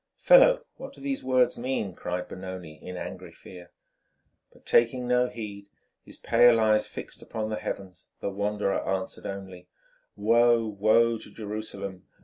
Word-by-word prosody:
"Fellow, - - +6
what 270 +1 -9
do - - -16
these 275 -1 -3
words 130 -2 +2
mean?" 120 -6 -2
cried 90 +1 -4
Benoni 90 -4 -8
in 90 0 -7
angry - - -7
fear. 90 -1 -13 0.8
But, - - -23
taking 120 +1 +2
no 125 0 +3
heed, 100 -4 -8 0.4
his - - -12
pale 120 -1 +5
eyes 110 -1 +3
fixed - - -8
upon 110 -1 -4
the 110 - -2
heavens, 95 -2 -7
the 100 - -3
wanderer 100 0 -1
answered 95 0 -3
only, 95 -2 -8 0.5
"Woe, 115 +2 +4
woe 110 +2 +3
to - - -11
Jerusalem! 100 -3 -6
105 Hz, 145 wpm, -27 LUFS, 95-120 Hz, 0.8 s, Fellow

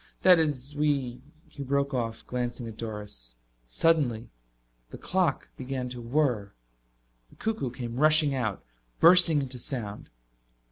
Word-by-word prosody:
"That 180 -2 +7
is, 145 -3 0
we 140 -5 0
" 155 - -32
He 140 - -7
broke 140 +1 0
off, 115 -3 -3
glancing 120 -1 -4
at 110 - -8
Doris. 105 - -5 0.3
Suddenly 120 - +1 0.6
the - - -9
clock - - -1
began 130 -1 -4
to 125 -1 -7
whirr. 120 -5 0 0.8
The - - -20
cuckoo 220 - -2
came 120 -1 -6
rushing 155 0 +5
out, 110 -7 -2 0.4
bursting 170 -4 +6
into 130 -1 -6
sound. 115 -6 -5
130 Hz, 135 wpm, -27 LUFS, 115-150 Hz, 0.8 s, That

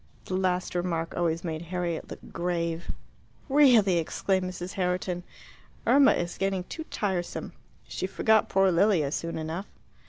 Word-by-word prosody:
The - - -5
last 185 -1 0
remark 170 -2 -2
always 165 -1 0
made 160 -2 -3
Harriet 175 -1 -3
look - - -10
grave. 170 -1 -2 0.6
"Really," 245 - +5
exclaimed 185 +3 0
Mrs. 180 0 -6
Herriton, 180 -1 -1 0.6
"Irma 275 0 +6
is 175 0 -3
getting 195 -1 0
too 320 - -7
tiresome. 190 - -3 0.3
She 185 - -3
forgot 220 +3 +3
poor 195 0 +4
Lilia 175 -5 +3
soon 165 +1 -3
enough." 160 +5 -4
180 Hz, 135 wpm, -27 LUFS, 170-195 Hz, 0.6 s, Irma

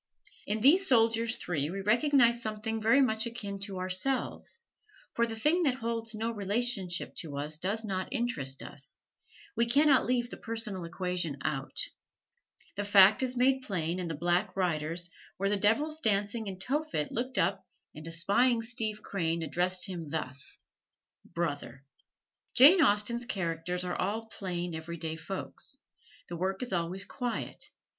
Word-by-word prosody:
In 210 +1 -1
these 350 - +6
soldiers 230 -1 +3
three 150 -4 -2
we 195 +3 -4
recognize 235 +2 +4
something 220 0 -3
very 230 +6 +5
much 220 -3 +1
akin 205 -4 -6
to 195 -1 -5
ourselves, 220 - -2 0.5
for 235 0 +1
the 225 - -5
thing 300 +10 +2
that 275 -7 +2
holds 230 -2 -3
no 225 +2 -2
relationship 205 -3 0
to 145 -4 -5
us 150 +2 -2
does 200 +6 -2
not 190 -2 -2
interest 195 - -1
us 140 +2 -10 0.6
we 235 +1 +2
can 285 +6 +4
not 270 -3 +5
leave 245 -1 0
the - - -7
personal 220 -6 -4
equation 175 -3 -2
out. 135 -4 -3 1.0
This 205 0 -3
fact 200 +2 +7
is 255 -1 -1
made 265 +2 +3
plain 180 -6 -2
in 180 - -3
"The 165 - -3
Black 175 +5 0
Riders," 170 -1 -1 0.3
where 195 +1 0
the 205 - +2
devils 290 +11 +1
dancing 210 +1 +1
in 190 -1 -5
Tophet 270 - -2
look 255 +3 -3
up - - +1 0.3
and 155 +1 -9
espying 205 +9 +2
Steve 220 -2 -2
Crane 165 -3 -1
address 180 +3 +2
him 175 -6 -5
thus: 140 -2 -1 0.7
"Brother!" 145 -6 -4 0.7
Jane 310 +9 +8
Austen's 235 0 +2
characters 180 -1 -2
are 180 - -2
all 215 +4 -2
plain, 175 -4 -4
every 160 +1 -6
day 160 -1 -3
folks. 165 +4 -5 0.5
The 175 - -6
work 190 +5 -2
is 245 - -3
always 180 +3 -1
quiet. 245 -2 -4
200 Hz, 155 wpm, -30 LUFS, 175-235 Hz, 1.0 s, Jane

